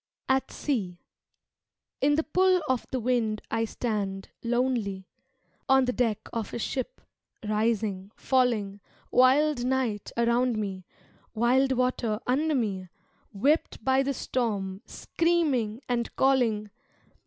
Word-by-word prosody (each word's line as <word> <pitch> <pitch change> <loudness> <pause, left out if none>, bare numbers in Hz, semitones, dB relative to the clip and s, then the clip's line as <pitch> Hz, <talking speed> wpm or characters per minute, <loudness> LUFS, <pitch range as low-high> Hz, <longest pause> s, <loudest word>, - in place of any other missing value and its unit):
At 265 0 +1
Sea 200 -12 -2 1.0
In 290 +2 +4
the 320 - +1
pull 370 +2 +3
of 260 -2 -1
the 260 - -2
wind 230 -3 0
I 225 0 +1
stand, 205 -4 -3
lonely, 235 -6 -1 0.6
On 265 -1 +5
the 250 - 0
deck 230 -4 -1
of 225 -3 -3
a - - -1
ship, 270 - -4 0.5
rising, 210 -3 0
falling, 230 -6 +1 0.3
Wild 265 +1 +4
night 250 -5 -1
around 235 0 +2
me, 190 -4 -4 0.5
wild 260 +4 +3
water 250 -4 0
under 295 +5 +1
me, 195 -7 -2 0.4
Whipped 275 +11 0
by 265 0 +4
the 275 0 -1
storm, 200 -7 -2
screaming 285 -10 0
and 240 -1 -2
calling. 230 -6 +2
240 Hz, 120 wpm, -27 LUFS, 210-265 Hz, 1.0 s, On